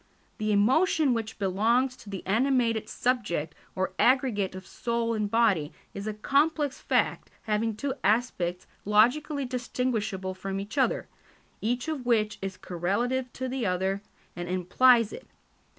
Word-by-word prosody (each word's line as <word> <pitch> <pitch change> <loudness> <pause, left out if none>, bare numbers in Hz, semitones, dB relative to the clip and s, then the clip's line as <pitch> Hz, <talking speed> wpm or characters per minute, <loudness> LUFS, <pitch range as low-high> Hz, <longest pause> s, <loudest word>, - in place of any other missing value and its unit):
The 215 0 0
emotion 265 - +3
which 225 -1 -3
belongs 225 +7 +1
to 210 - -13
the 195 -2 -6
animated 230 +1 +1
subject 205 -11 -1 0.2
or 185 0 -1
aggregate 245 -8 +2
of 185 0 -8
soul 235 +1 -2
and 210 -2 -1
body 200 -10 +2 0.2
is 200 +2 -6
a 215 - -2
complex 285 +4 +1
fact - - 0
having 220 0 0
two 270 +5 -2
aspects 190 -5 0 0.2
logically 265 +8 +3
distinguishable 230 -6 -2
from 195 +1 -4
each 200 +5 -7
other, 270 - +1 0.5
each 245 +5 -1
of 310 -5 -3
which 220 -3 +1
is 190 -1 -4
correlative 240 +9 -1
to 260 - -4
the 255 -4 -2
other 190 +2 0 0.3
and 175 0 -5
implies 225 +6 +4
it. - - -9
225 Hz, 140 wpm, -28 LUFS, 195-255 Hz, 0.5 s, implies